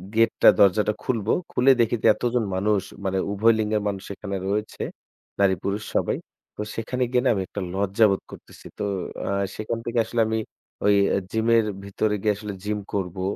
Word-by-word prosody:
gate 115 0 +4
টা - - +9
দরজাটা 105 +2 +4
খুলবো, 115 -4 0 0.2
খুলে 130 +2 +5
দেখিতে 115 0 0
এতজন 120 -1 0
মানুষ 100 +1 +2 0.2
মানে 95 0 0
উভয় 110 +3 +4
লিঙ্গের 105 0 0
মানুষ 100 -2 -3
এখানে 100 -1 -5
রয়েছে 105 +2 -2 0.6
নারী-পুরুষ 100 +1 +1
সবাই। - - +1 0.4
তো, - - -5
সেখানে 125 +3 -2
গিয়ে 125 -1 +3
না - - +5
আমি 100 - -1
একটা 100 - -5
লজ্জাবোধ 100 +1 +2
করতেছি। - - -13
তো - - -1 0.4
আ - - -1 0.3
সেখান 110 +2 -3
থেকে 120 0 0
আসলে 120 - 0
আমি 110 0 0 0.5
ওই 105 0 +5 0.2
অ্যা - - +2
জিমের 115 0 +3 0.2
ভিতরে 105 +2 0
গিয়ে 105 0 +2
আসলে 105 0 -6
gym 105 0 -2
করবো 95 -2 -2
105 Hz, 170 wpm, -24 LUFS, 100-115 Hz, 0.6 s, টা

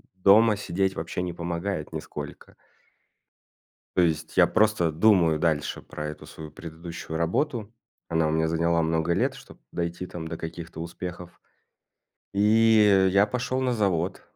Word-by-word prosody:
дома 105 +3 +5
сидеть 95 -1 -1
вообще 85 +2 -4
не 90 -1 -3
помогает 85 -1 -4
нисколько. - - -8 1.4
То - - +4
есть 80 -3 -1
я - - +8
просто 105 -6 +2
думаю 85 -3 +4
дальше 80 -3 0
про 75 0 -6
эту 75 0 -8
свою 75 +1 -10
предыдущую 80 +1 -7
работу. 110 - -1 0.4
Она 80 -1 +1
у - - 0
меня 80 +1 +1
заняла 85 +1 +1
много 80 +1 +1
лет, - - +1
чтоб - - -14
дойти 85 +1 -3
там 85 -3 -7
до 80 0 -5
каких-то 80 0 -7
успехов. 90 +1 -8 0.9
И 105 -2 +5
я 100 +2 +5
пошёл 125 +2 -2
на 130 -1 +1
завод. 95 -5 0
85 Hz, 140 wpm, -26 LUFS, 80-100 Hz, 1.4 s, я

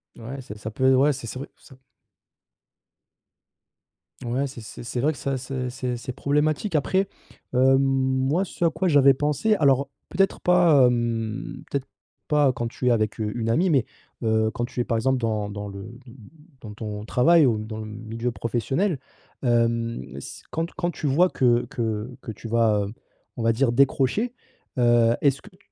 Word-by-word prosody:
Ouais 130 +4 -7
c'est 105 -4 -9
ça 110 - -5
peut 130 +4 +3
ouais, 140 +3 +4
c'est 130 -2 -7
c'est 130 - -6
vrai 140 - -7
ça 135 - -17
p 130 - -29 2.4
ouais, 125 +4 -1
c'est 130 -3 -9
c'est 110 - -10
c'est 120 +1 -3
vrai 150 - +3
que 145 - -9
ça 135 +2 -2
c'est 130 0 -4
c'est 125 -1 -3
c'est 125 +1 -6
problématique. 150 +7 0
Après, 190 +7 +1 0.4
hem, 130 +1 +5
moi, 135 +5 +1
ce 175 - -5
à 170 - +5
quoi 185 +4 -1
j'avais 140 -3 +6
pensé, 150 +10 +1
alors 140 -4 +3 0.2
peut-être 195 +2 +1
pas, 170 -7 +5
hem, 120 +2 -2
peut-être 140 -1 -3 0.4
pas 145 -3 +4
quand 120 -1 -3
tu 125 +2 -4
es - - +5
avec, 110 -1 0
heu, 105 -1 -1
une 115 -1 -2
amie, 175 +11 +2
mais, 135 -6 +3 0.4
heu, 110 0 +2
quand 120 - -3
tu 125 - -7
es, - - +3
par 115 - 0
exemple, 130 +3 +1
dans 110 -3 -1
dans 105 0 -6
le 100 0 -8 0.2
de 120 - -13 0.5
dans 105 -2 -8
ton 105 -1 -6
travail 155 +7 +5
ou 115 -4 +2
dans 110 +1 -6
le 110 - -5
milieu 115 +3 -4
professionnel, 135 - -1 0.4
hem, 115 -1 +1
s 70 - -9
quand 165 +1 -2
quand 175 -1 -2
tu 150 - -4
vois 175 +7 +4
que 120 -2 +2
que 110 0 -3
que 110 - -6
tu 110 - -9
vas, 110 -2 +2
heu, 105 - -7 0.4
on 115 - -4
va 115 - +4
dire, 120 +1 +2
décrocher, 140 - +2 0.4
heu, 120 -1 +4
est-ce 140 -1 +2
que 210 - -14
tu 185 - -24
125 Hz, 190 wpm, -24 LUFS, 115-140 Hz, 2.4 s, j'avais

